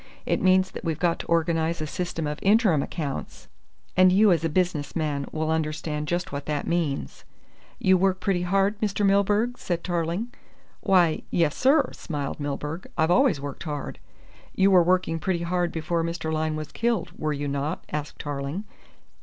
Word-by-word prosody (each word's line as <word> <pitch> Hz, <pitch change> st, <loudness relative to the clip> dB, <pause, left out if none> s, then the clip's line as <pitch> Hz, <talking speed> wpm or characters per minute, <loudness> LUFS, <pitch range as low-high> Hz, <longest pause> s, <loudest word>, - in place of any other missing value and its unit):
It -, -, 0 dB
means 185 Hz, 0 st, +4 dB
that -, -, -8 dB
we've 165 Hz, -3 st, -1 dB
got 170 Hz, 0 st, +1 dB
to -, -, -7 dB
organise 165 Hz, 0 st, +1 dB
a 155 Hz, -, -2 dB
system 165 Hz, +1 st, -3 dB
of 150 Hz, 0 st, -3 dB
interim 200 Hz, -, +4 dB
accounts, 145 Hz, -4 st, -5 dB, 0.5 s
and 185 Hz, 0 st, +6 dB
you 205 Hz, +2 st, +5 dB
as 165 Hz, -2 st, +2 dB
a 165 Hz, -, +1 dB
business 170 Hz, -3 st, -1 dB
man 150 Hz, -4 st, -1 dB
will 155 Hz, 0 st, -1 dB
understand 155 Hz, -1 st, -2 dB
just 175 Hz, +3 st, -2 dB
what 140 Hz, 0 st, -5 dB
that 150 Hz, -1 st, -1 dB
means." 150 Hz, -, -2 dB, 0.5 s
"You 185 Hz, 0 st, +4 dB
work 190 Hz, 0 st, +2 dB
pretty 185 Hz, -1 st, 0 dB
hard, 195 Hz, +3 st, +1 dB
Mr. 205 Hz, -1 st, 0 dB
Milburgh?" 205 Hz, +5 st, +2 dB
said 170 Hz, -2 st, -2 dB
Tarling. 175 Hz, +7 st, -2 dB, 0.5 s
"Why, 180 Hz, -5 st, +3 dB
yes, 165 Hz, -4 st, +1 dB
sir," 275 Hz, 0 st, +3 dB
smiled 145 Hz, -4 st, -5 dB
Milburgh. 150 Hz, +4 st, -4 dB
"I've 160 Hz, +2 st, +3 dB
always 250 Hz, -, +4 dB
worked 140 Hz, -1 st, -6 dB
hard." 150 Hz, -3 st, -5 dB, 0.6 s
"You 195 Hz, +1 st, +4 dB
were 185 Hz, -2 st, +7 dB
working 175 Hz, -1 st, +1 dB
pretty 170 Hz, +1 st, -1 dB
hard 175 Hz, 0 st, 0 dB
before 165 Hz, +1 st, -1 dB
Mr. 165 Hz, -1 st, -3 dB
Lyne 155 Hz, 0 st, 0 dB
was 155 Hz, -1 st, -6 dB
killed, 235 Hz, -1 st, -1 dB
were 155 Hz, -, -2 dB
you 145 Hz, 0 st, -3 dB
not?" 140 Hz, +4 st, -2 dB
asked 150 Hz, -1 st, -4 dB
Tarling. 145 Hz, +6 st, -4 dB
170 Hz, 175 wpm, -25 LUFS, 155-185 Hz, 0.6 s, were